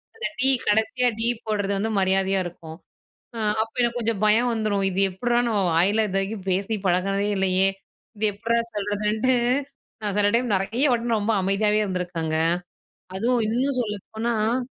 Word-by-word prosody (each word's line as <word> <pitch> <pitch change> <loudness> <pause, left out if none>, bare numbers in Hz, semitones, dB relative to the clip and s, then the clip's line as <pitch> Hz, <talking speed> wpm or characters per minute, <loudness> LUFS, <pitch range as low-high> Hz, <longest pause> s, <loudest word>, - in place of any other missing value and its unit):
அந்த 455 - -5
'டீ' 265 +1 +5 0.2
கடைசியா 220 +4 +2
'டீ' 230 +1 +1 0.2
போடுறது 205 -2 -1
வந்து 220 +3 -1
மரியாதையா 190 0 +2
இருக்கும். 165 -2 -9 0.6
அ - - -5 0.2
அப்போ 225 - -7
எனக்கு 240 0 0
கொஞ்சம் 225 -3 -1
பயம் 235 +4 +4
வந்துரும். 210 -3 0
இது 185 - -1
எப்புடுறா? 240 +6 0
நம்ம 205 -3 +1
வாயில 205 +6 +3
இது 195 - -3
வரைக்கும் 195 0 -4
பேசி 195 +4 0
பழகினதே 195 +3 +1
இல்லையே, 190 0 +2 0.5
இது 215 - -3
எப்புட்றா 230 +3 -1 0.2
சொல்றதுன்ட்டு. 210 +4 0 0.7
நான் 205 -1 -2
சில 205 0 +4
டைம் 240 -2 +1
நெறைய 215 +7 -1
வாட்டி 235 -1 0
ரொம்ப 220 +2 0
அமைதியாவே 210 +2 +2
இருந்துருக்கங்க. 175 -4 -3 0.8
அதுவும் 235 +2 +1
இன்னும் 255 +3 0
சொல்லப்போனா 220 +3 -2
210 Hz, 150 wpm, -23 LUFS, 195-230 Hz, 0.8 s, டீ